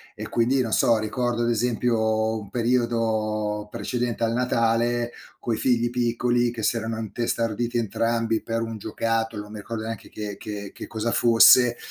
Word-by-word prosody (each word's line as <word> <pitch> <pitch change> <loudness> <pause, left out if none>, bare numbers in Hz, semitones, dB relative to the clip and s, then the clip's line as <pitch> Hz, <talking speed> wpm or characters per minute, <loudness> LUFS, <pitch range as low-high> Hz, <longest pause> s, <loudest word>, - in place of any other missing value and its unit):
e - - -6
quindi, 125 +3 +2
non 115 -3 -2
so, 115 - +4
ricordo 120 +2 -1
ad 120 - +1
esempio, 110 -1 0
un 100 -2 -11
periodo 110 -3 0
precedente 120 0 -3
al 115 0 +1
Natale, 120 0 +1 0.3
coi 115 - -2
figli 120 -2 +1
piccoli 120 0 +1
che 115 -2 -6
si 120 - +2
erano 115 0 -3
intestarditi 115 +1 -2
entrambi 115 0 0
per 115 0 -3
un 115 -1 -5
giocattolo, 110 0 -2
non 105 - -13
mi 105 - -7
ricordo 110 +1 -5
neanche 115 -2 -6
che 105 -2 -6
che 105 -2 -7
che - - -8
cosa 115 +1 -2
fosse, 120 +1 +6
115 Hz, 160 wpm, -24 LUFS, 110-120 Hz, 0.3 s, fosse